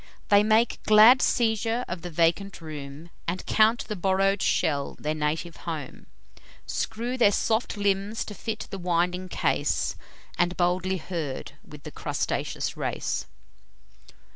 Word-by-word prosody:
They 205 0 +7
make 220 +2 +2
glad 220 +4 +7
seizure 225 0 +1
of 175 -1 -5
the 175 - -6
vacant 170 +4 +1
room, 155 0 -9 0.2
And 180 +2 -3
count 220 +2 +3
the 215 - -3
borrow'd 195 +1 +1
shell 140 -3 0
their 150 +1 -1
native 155 +2 -2
home; 155 -6 -7 0.6
Screw 240 +3 -3
their 205 -4 +6
soft 220 +2 0
limbs 200 +2 0
to 210 - -7
fit 220 +1 -5
the 195 - -5
winding 180 +1 0
case, - - 0 0.4
And 175 +1 +1
boldly 180 +1 +1
herd 160 -6 -5
with 150 -1 -13
the - - -8
crustaceous - - -3
race. - - -3
185 Hz, 135 wpm, -26 LUFS, 165-215 Hz, 0.6 s, They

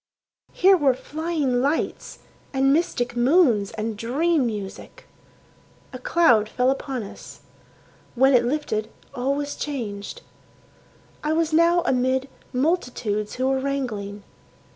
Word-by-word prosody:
Here 385 +1 +5
were 280 -7 +3
flying 295 -4 -1
lights, 285 +4 -2 0.4
and 270 +1 +3
mystic 245 -6 0
moons, 245 - +3
and 220 0 -3
dream 275 +6 +1
music. 205 -4 -7 0.9
A 255 - -6
cloud 245 -8 +3
fell 250 +3 +2
upon 270 -3 -3
us. 200 - -11 0.7
When 265 +3 +4
it 245 -1 +5
lifted 240 -5 -2 0.2
all 270 +1 -1
was 290 0 -3
changed. 235 - -5 1.0
I 305 +1 0
was 320 -1 0
now 340 +2 +4
amid 260 -1 +1 0.2
multitudes 250 - -1
who 255 - -1
were 265 0 +1
wrangling. 220 -8 -3
265 Hz, 120 wpm, -23 LUFS, 235-300 Hz, 1.0 s, Here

